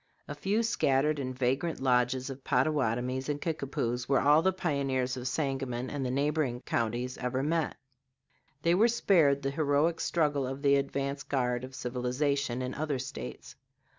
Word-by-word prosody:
A - - -4
few 195 +10 0
scattered 150 - +2
and 130 -2 -4
vagrant 135 +6 0
lodges 125 +1 +1
of 135 0 -9
Pottawatomies 130 -1 0
and 145 -1 -1
Kickapoos 135 -6 -2
were 135 -2 +4
all 150 +2 +5
the 190 +2 +3
pioneers 135 -7 -1
of 125 0 -4
Sangamon 135 -3 -2
and 145 -2 -3
the 130 - -1
neighboring 140 -2 0
counties 120 +3 -2
ever 130 +1 -1
met. 160 +1 0 0.9
They 170 - +4
were 210 +6 +5
spared 165 -12 +3
the 135 - 0
heroic 150 +3 +1
struggle 145 -6 +1
of 135 +2 -6
the 140 -1 +5
advance 140 0 -1
guard 125 -3 -1
of 130 +1 -8
civilization 125 +1 -1
in 125 - -3
other 150 -2 -2
States. 65 - -7
135 Hz, 160 wpm, -30 LUFS, 125-150 Hz, 0.9 s, all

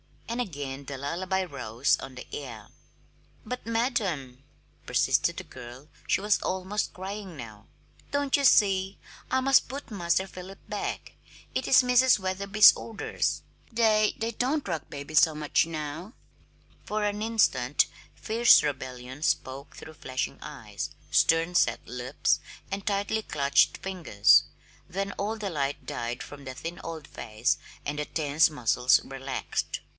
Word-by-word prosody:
And 235 +1 -3
again 140 - -5
the 140 0 -6
lullaby 180 +7 -1
rose 125 -6 0
on 135 -1 -9
the 125 - -8
air. 120 -7 -7 0.8
"But, 250 +1 -6
madam," 195 - -1 0.4
persisted - - +2
the - - -4
girl 125 +4 -11 0.2
she - - +2
was 210 0 +2
almost 190 +3 -2
crying 190 -1 -6
now 110 -6 -10 0.4
"don't 285 -1 +1
you 280 - +1
see? 195 -5 +4 0.3
I 260 - +2
must 270 0 +4
put 270 0 -7
Master 175 -2 +1
Philip 190 +1 -10
back. - - -4 0.4
It 260 - -1
is 260 - +7
Mrs. 250 0 +5
Wetherby's 200 +2 +5
orders. 225 -2 -3 0.3
They 220 -2 +3
they 225 +1 -2
don't 265 +6 -1
rock 160 - -4
babies 145 +1 +1
so 160 -2 +4
much 150 +1 +1
now." 160 +5 -5 0.7
For 215 0 -2
an 205 0 -1
instant 205 - +2 0.3
fierce 230 +2 +5
rebellion 130 -2 -5
spoke 135 -2 -1
through 160 0 -11
flashing 130 -2 -4
eyes, - - -6 0.2
stern 165 +2 +3
set 115 -8 +2
lips, 125 +3 0 0.3
and 195 0 -4
tightly 205 +2 0
clutched 140 -8 +2
fingers; 175 - +4 0.4
then 195 +2 -2
all 210 +3 -1
the 210 -2 -3
light 140 -2 -2
died 120 +2 -4
from 140 +1 -11
the 130 0 -6
thin 165 +6 -6
old 160 -2 -6
face 110 -2 -1 0.3
and 145 +1 -3
the 150 - -1
tense 155 0 +2
muscles 125 -3 +3
relaxed. 135 0 -4
170 Hz, 140 wpm, -28 LUFS, 135-210 Hz, 0.8 s, is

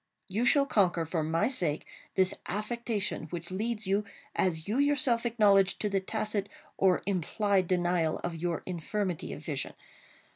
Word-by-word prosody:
You 215 +5 0
shall 275 +1 +5
conquer, 180 -9 +2
for 160 0 -1
my 160 +2 +1
sake, 175 - -1 0.3
this 190 0 +3
affectation 210 -3 -2
which 170 +2 -6
leads 215 +3 -2
you, 200 +2 +2 0.3
as 160 -4 0
you 220 +6 0
yourself 260 -5 +3
acknowledge, 200 -4 +4
to 210 - 0
the 195 -1 +1
tacit 210 0 -2 0.3
or 185 -2 +3
implied 195 +1 +1
denial 175 -3 +1
of 175 - -2
your 170 0 -2
infirmity 180 0 -3
of 150 - -8
vision. 140 -4 -3
195 Hz, 150 wpm, -30 LUFS, 175-215 Hz, 0.3 s, shall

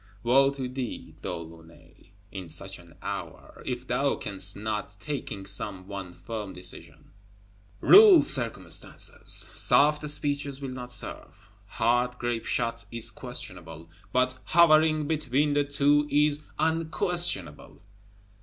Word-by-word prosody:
Wo 135 +3 +5
to 135 -2 -4
thee, 125 -1 -6
De - - -4
Launay, 85 +1 -12 0.2
in 95 -4 -7
such 95 +4 -3
an 85 -2 -17
hour, - - -7
if - - -3
thou - - 0
canst 95 0 0
not, 105 0 -4
taking 135 -9 -5
some 95 -1 -5
one 100 -3 -7
firm 100 +3 -7
decision, 90 0 -3 0.7
rule 400 -4 +9
circumstances! - - -1
Soft 150 +1 +4
speeches 145 -1 -2
will 135 -2 -5
not 125 -1 -7
serve, 125 0 -6 0.2
hard 120 +2 0
grape 120 -2 -3
shot 115 0 -1
is 115 -1 -5
questionable, 80 0 -6 0.2
but 130 0 +1
hovering 155 -2 +4
between 145 -2 0
the 145 0 +2
two 145 +1 +2
is 150 0 +3 0.2
_un_questionable. 160 - -1
125 Hz, 120 wpm, -27 LUFS, 100-145 Hz, 0.7 s, rule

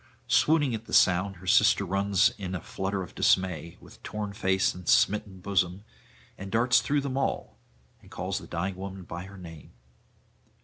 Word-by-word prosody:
Swooning 150 -5 +3
at 110 0 -5
the - - -11
sound, 95 +1 +3
her 90 +1 -14
sister 105 0 +4
runs 100 +3 +2
in 95 -1 -4
a - - -3
flutter 95 0 -3
of 90 - -11
dismay, 85 -3 +1
with - - -17
torn 105 -1 -5
face 95 -2 +1
and 90 -1 -7
smitten 100 -2 +2
bosom, 95 0 0 0.6
and 95 0 -7
darts 120 +2 +3
through 145 0 0
them 135 -1 -3
all, 135 - -2 0.4
and - - -18
calls - - -3
the - - -12
dying 90 +3 -3
woman 95 0 -7
by 85 +1 -7
her 100 +1 -12
name. 80 -4 -12
95 Hz, 175 wpm, -27 LUFS, 90-105 Hz, 0.6 s, sister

